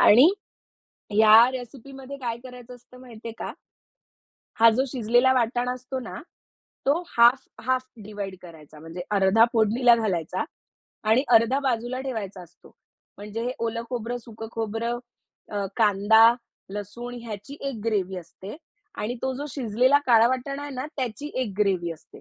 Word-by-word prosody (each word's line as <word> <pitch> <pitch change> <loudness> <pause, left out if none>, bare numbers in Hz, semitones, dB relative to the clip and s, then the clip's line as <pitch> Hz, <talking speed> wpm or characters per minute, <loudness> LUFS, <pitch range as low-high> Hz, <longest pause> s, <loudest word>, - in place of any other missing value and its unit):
आणि 250 +10 +8 0.9
या 220 +3 +8
रेसिपीमध्ये 265 +2 -8
काय 235 -3 -3
करायचं 250 -1 -11
असतं 250 +1 -18
माहितीये 230 -2 -9
का? - - -5 1.1
हा 230 0 +8
जो 250 +4 +1
शिजलेला 245 +1 +3
वाटाण 245 0 0
असतो 255 +1 -4
ना, 235 - -7 0.7
तो 295 +6 +2 0.2
हाल्फ, 240 +3 +5 0.2
हाल्फ 255 0 +1 0.2
डिव्हाईड 200 -2 -6
करायचा. 155 -3 -14
म्हणजे 165 +3 -8
अर्धा 205 +3 +5
फोडणीला 235 +2 +4
घालायचा 190 - -1 0.7
आणि 250 +5 +4
अर्धा 230 +5 +4
बाजूला 255 -1 -1
ठेवायचा 205 -8 -5
असतो. 175 0 -18 0.4
म्हणजे 210 +2 -6
हे 250 - -1
ओलं 230 0 -2
खोबरं, 245 0 -3
सुकं 225 -1 -9
खोबरं, 225 +2 -3 0.5
अ, 200 -1 -2
कांदा, 220 +2 +5 0.4
लसूण 235 +4 -6
ह्याची 230 +5 -8
एक 230 -5 -7
ग्रेव्ही. 190 -4 -1
असते. 185 - -10 0.4
आणि 235 +4 -3
तो 265 0 -1
जो 285 +3 -5
शिजलेला 255 +2 +2
काळा 230 -2 +6
वाटाणा 260 +2 -3
आहे 290 0 -6
ना 255 +3 -3
त्याची 260 +4 -4
एक 255 -6 -2
ग्रेव्ही. 185 -4 +1
असते. 160 - -20
230 Hz, 145 wpm, -25 LUFS, 210-255 Hz, 1.1 s, आणि